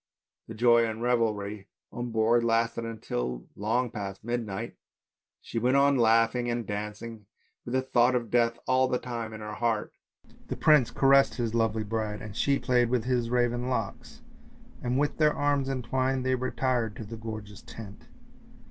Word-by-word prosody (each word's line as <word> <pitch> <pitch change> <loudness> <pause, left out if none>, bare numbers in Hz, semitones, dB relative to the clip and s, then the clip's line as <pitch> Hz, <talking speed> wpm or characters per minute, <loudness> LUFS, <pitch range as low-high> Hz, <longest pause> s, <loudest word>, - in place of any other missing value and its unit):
The 115 - -8
joy 120 +1 +5
and 110 +1 -5
revelry 105 -4 0 0.2
on 120 0 -4
board 115 +1 +2
lasted 115 -1 -1
till - - -3
long 115 +4 0
past 100 -3 -6
midnight, 115 -4 -3 0.7
she 115 - -3
went 125 +4 +3
on 140 0 +4
laughing 115 0 +3
and 120 -1 -2
dancing 105 +1 -6 0.4
with 120 - -3
the 130 - +2
thought 125 -1 +3
of 120 -2 -2
death 115 -1 +2
all 130 0 +3
the 125 - 0
time 115 -3 -5
in 110 0 -8
her 105 0 -6
heart. 115 -2 -1 0.5
The - - -4
prince 150 -6 +5
caressed 135 0 +4
his 115 -3 -2
lovely 115 -1 +1
bride 105 0 -3
and 110 -3 -9
she 140 -1 +2
played 125 -2 +2
with 125 -2 +1
his 120 -1 0
raven 120 0 0
locks, 125 - -4 0.6
and 125 +1 -1
with 145 +1 0
their 150 -1 +4
arms 145 -2 +1
entwined 130 0 -1
they 130 - +2
retired 125 -3 -1
to - - -7
the 115 +3 -7
gorgeous 110 -2 -8
tent. 105 -2 -11
115 Hz, 165 wpm, -28 LUFS, 110-125 Hz, 0.7 s, joy